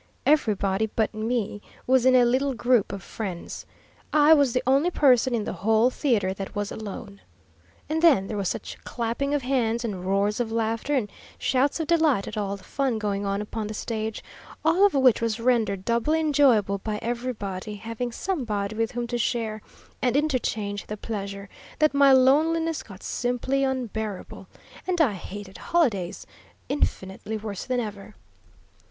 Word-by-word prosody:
Everybody 215 -7 +2
but 220 0 -1
me 215 -1 -2 0.2
was 260 0 +4
in 255 - +6
a 250 -1 +6
little 260 +2 +1
group 240 -4 +2
of 195 -1 -6
friends. 190 -6 -6 0.4
I 300 +1 +6
was 285 -5 +4
the 250 +2 0
only 275 +6 +3
person 260 -6 +4
in 220 - -1
the - - -4
whole 220 +4 +2
theatre 220 -10 +1
that 195 +1 -7
was 205 0 -2
alone. 200 -2 -7 0.7
And 315 +2 -1
then 295 - +5
there 210 - -5
was 200 -3 -1
such - - -5
clapping 240 +5 -2
of 285 - -1
hands, 240 -3 0
and 195 -5 -4
roars 200 +3 +1
of 235 -2 -1
laughter, 230 +5 -1
and 245 -6 0 0.3
shouts 275 +4 +1
of 320 - -1
delight 315 -10 +2
at - - -6
all 200 -2 -2
the 190 - -18
fun 265 +1 -1
going 205 -2 -2
on 200 +1 -1
upon 215 0 -4
the 215 - -6
stage, 220 0 -4 0.4
all 355 +5 +5
of 390 - -5
which 260 -4 +4
was 230 -1 -1
rendered 220 -6 +1
doubly 235 +7 +1
enjoyable 265 -10 +3
by 210 +1 -3
everybody 220 -5 -4
having 230 +3 -4
somebody 225 - -2
with 225 0 -1
whom 240 0 -2
to 240 0 -3
share 220 -2 -1 0.4
and 255 +1 +2
interchange 225 -8 -1
the 210 - -5
pleasure, 200 -2 -5 0.3
that 305 -1 +3
my 280 -1 +6
loneliness 315 +5 +3
got 195 -2 -13
simply 250 +3 -1
unbearable, 220 -6 -4 0.4
and 360 -2 0
I 275 -10 +4
hated 195 +1 -8
holidays 210 - 0 0.4
infinitely 210 -5 -2
worse 210 -3 -6
than 255 -1 0
ever. 210 -2 -6
230 Hz, 165 wpm, -25 LUFS, 205-265 Hz, 0.7 s, in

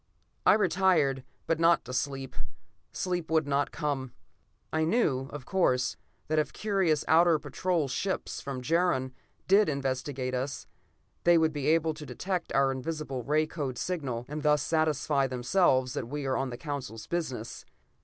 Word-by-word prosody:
I - - +9
retired, 175 -9 +2 0.2
but 165 -1 0
not 165 0 +4
to 125 - -7
sleep. 135 0 -3 0.6
Sleep 180 -3 -2
would 160 -2 +2
not 140 0 +1
come. 140 -5 -3 0.6
I 160 0 +2
knew, 155 - +1
of 145 -4 -8
course, 130 -10 +1 0.3
that 155 0 +2
if 155 - -1
curious 190 -8 +1
outer 165 0 +5
patrol 155 +2 -1
ships 190 +9 -3
from 135 -2 -5
Jaron 160 -4 +1 0.4
did 200 -1 +5
investigate 130 -2 -2
us, 130 +2 -3 0.6
they 175 0 +6
would 160 -1 +2
be 145 -2 -2
able 160 0 +3
to 155 - -9
detect 185 -3 -3
our 135 0 +3
invisible 135 0 -4
ray 150 +6 +2
code 140 -5 -4
signal, 130 -8 -3
and 150 +1 -5
thus 150 -1 +3
satisfy 150 -3 +1
themselves 130 0 +2
that - - -3
we 145 +1 -4
were 130 - +1
on 135 -1 -1
the 120 - -6
Council's 130 -7 -5
business. 130 -10 -4
150 Hz, 155 wpm, -29 LUFS, 130-165 Hz, 0.6 s, I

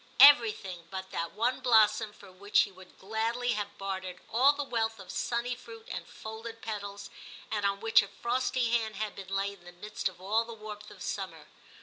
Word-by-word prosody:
Everything 220 -10 +7
but 190 0 -6
that 165 0 -3
one 235 +4 +1
blossom 220 -2 +4
for 200 -2 -15
which 200 +3 +3
he - - -1
would 185 0 -16
gladly 225 +4 -1
have 210 -2 -4
bartered 190 -2 -4
all 255 +5 +6
the 290 0 -3
wealth 225 -4 -1
of 190 - -9
sunny 235 +1 -1
fruit 230 -2 -11
and 180 -2 -5
folded 225 +1 -8
petals, 200 -2 -5 0.4
and 205 -2 +1
on 200 0 -1
which 225 0 +6
a 200 - -5
frosty 245 +1 0
hand 220 -2 +1
had 215 +1 -3
been 195 -1 -8
laid 195 0 -1
in 175 - -22
the 175 - -10
midst 205 +2 -3
of 180 - -17
all 210 +5 +2
the 230 0 -9
warmth 210 -1 -8
of - - -11
summer. - - -4
215 Hz, 200 wpm, -30 LUFS, 195-230 Hz, 0.4 s, Everything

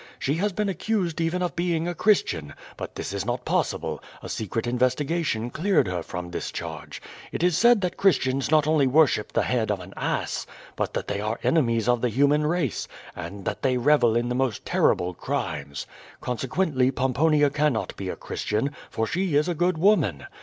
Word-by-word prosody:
She 140 - -1
has 205 +4 +1
been 210 +2 -1
accused 185 -3 -1
even 170 +2 0
of 175 - -2
being 170 -1 0
a 175 - -1
Christian, 120 - +1 0.2
but - - -7
this - - -4
is 100 -2 -2
not 120 +3 -3
possible; - - -1 0.2
a - - -7
secret 110 +2 -3
investigation 125 0 0
cleared 185 +4 +2
her 90 -1 -2
from 85 +1 -6
this - - -4
charge. - - -6 0.3
It - - -3
is 180 -2 +3
said 235 +1 +5
that 180 -2 -2
Christians 135 -8 +2
not 155 -1 +4
only 155 -3 +3
worship 135 -5 +3
the - - +1
head 120 -4 0
of 105 -2 0
an 90 +2 -10
ass, - - -2 0.3
but - - -2
that - - -2
they 100 0 -2
are 110 +2 -2
enemies 115 -8 +2
of 120 -1 +3
the 125 - +2
human 145 +5 +3
race, 155 - -1 0.3
and 95 +4 -7
that - - -3
they 130 -1 +2
revel 125 -3 +4
in 120 +1 +1
the 125 - -1
most 125 -4 -1
terrible 90 +1 +2
crimes. 70 -3 -4 0.3
Consequently 130 +2 0
Pomponia 145 +3 +2
cannot 145 -5 0
be 95 -2 -5
a - - -3
Christian, 110 +7 -2 0.2
for 115 - -1
she 180 +4 -1
is 150 +3 +3
a 175 - 0
good 175 +1 +1
woman. 155 - +2
135 Hz, 190 wpm, -25 LUFS, 115-165 Hz, 0.3 s, said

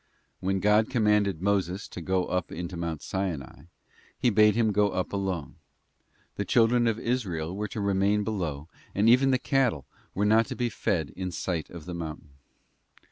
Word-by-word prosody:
When 95 +1 0
God 105 +2 +4
commanded 105 -7 +2
Moses 100 -1 0
to 90 - -7
go 95 +1 0
up 90 -2 -2
into 90 +2 -5
Mount 85 -3 -4
Sinai, 90 -9 -4 0.5
He 120 - +2
bade 105 0 +5
him 115 -2 +2
go 105 0 +3
up 95 0 -3
alone; 95 -6 -3 0.8
the - - 0
children 120 +1 +3
of 110 -1 +1
Israel 95 -9 -2
were 105 +1 -2
to 105 - -6
remain 100 +1 +2
below, 85 -9 -3 0.3
and 105 +3 +3
even 125 +3 +6
the 130 - +4
cattle 130 - +1 0.3
were 100 - +1
not 110 +2 +4
to - - -5 0.2
feed 80 -11 -1
in 95 +6 -4
sight 85 -2 -3
of 85 -3 -10
the 90 - -6
mountain. 80 -4 -7
95 Hz, 170 wpm, -27 LUFS, 85-110 Hz, 0.8 s, even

